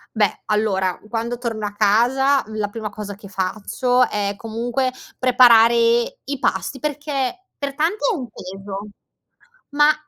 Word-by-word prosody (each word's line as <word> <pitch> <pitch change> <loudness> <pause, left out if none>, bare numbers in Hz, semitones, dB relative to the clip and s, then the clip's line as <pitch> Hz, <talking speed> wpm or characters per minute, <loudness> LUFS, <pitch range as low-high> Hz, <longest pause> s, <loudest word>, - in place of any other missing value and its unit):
Beh, 210 -3 +1
allora 195 -4 0
quando 235 +1 -3
torno 225 -3 -3
a 205 - -3
casa 245 +7 +3
la 215 -1 -2
prima 215 +1 -5
cosa 205 -1 -7
che 200 0 -13
faccio 215 +6 0
è 205 -1 -2
comunque 235 +4 -2 0.3
preparare 240 -2 +6 0.5
i 280 0 -4
pasti 275 - -1
perché 295 +4 -3
per 280 -1 -3
tanti 320 +8 0
è - - -1
un 260 -7 -5
peso. 195 +2 -8 0.8
Mah, 295 +1 +4
230 Hz, 135 wpm, -21 LUFS, 205-265 Hz, 0.8 s, preparare